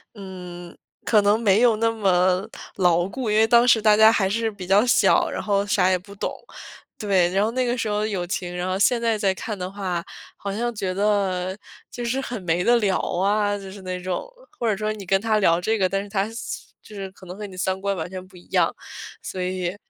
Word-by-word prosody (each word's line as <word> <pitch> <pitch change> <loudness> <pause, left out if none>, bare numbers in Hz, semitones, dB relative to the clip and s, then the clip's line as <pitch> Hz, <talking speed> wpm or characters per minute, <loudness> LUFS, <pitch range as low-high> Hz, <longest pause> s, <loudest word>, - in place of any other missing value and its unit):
嗯， 180 -3 -9 0.3
可 215 -2 +4
能 205 +2 +3
没 210 -2 +3
有 235 -3 +4
那 225 +1 +2
么 185 -3 +2 0.3
牢 175 -2 +2
固， 240 +3 -4
因 210 - +2
为 220 0 +5
当 235 +1 +5
时 230 -3 +5
大 215 -1 +5
家 220 +1 +7
还 195 -4 +1
是 225 +2 -1
比 195 -3 -9
较 200 +4 +4
小， 245 - +4
然 - - -4
后 200 -1 0
啥 195 -2 +2
也 185 - +3
不 200 +3 -13
懂， 200 - -3 0.6
对。 190 -4 +2
然 195 +1 +2
后 220 - 0
那 255 +1 0
个 245 +1 -1
时 225 - -1
候 210 0 0
友 190 -5 -3
情 180 -1 -3
然 180 +1 -2
后 185 0 -1
现 230 +4 +3
在 230 -2 +1
再 200 -2 +1
看 210 +2 -5
的 180 0 -4
话， 185 -4 -3 0.3
好 200 - -5
像 240 +4 -2
觉 190 -3 -2
得 190 -2 0 0.3
就 240 - -6
是 240 +3 -1
很 245 -5 -5
没 175 0 0
得 240 - +4
聊 200 -5 +1
啊， 205 +2 0
就 195 -1 -9
是 195 0 -10
那 185 -1 -5
种， 180 -1 -3 0.3
或 235 - 0
者 210 - +1
说 215 +1 -2
你 210 -2 -7
跟 195 +2 +2
他 220 -1 +1
聊 170 -4 +3
这 220 +4 0
个， 190 -3 +2
但 195 +1 -2
是 205 - -11
他 195 0 0
是 225 - -11 0.5
就 215 - -14
是 195 -1 -5
可 190 - -16
能 180 +1 -9
和 210 - -6
你 190 - -12
三 190 +1 -1
观 200 0 -1
完 165 -1 -4
全 185 0 -7
不 185 - -20
一 175 - -15
样， - - +1 0.5
所 185 - -5
以 180 0 -2
200 Hz, 260 characters per minute, -23 LUFS, 185-215 Hz, 0.6 s, 家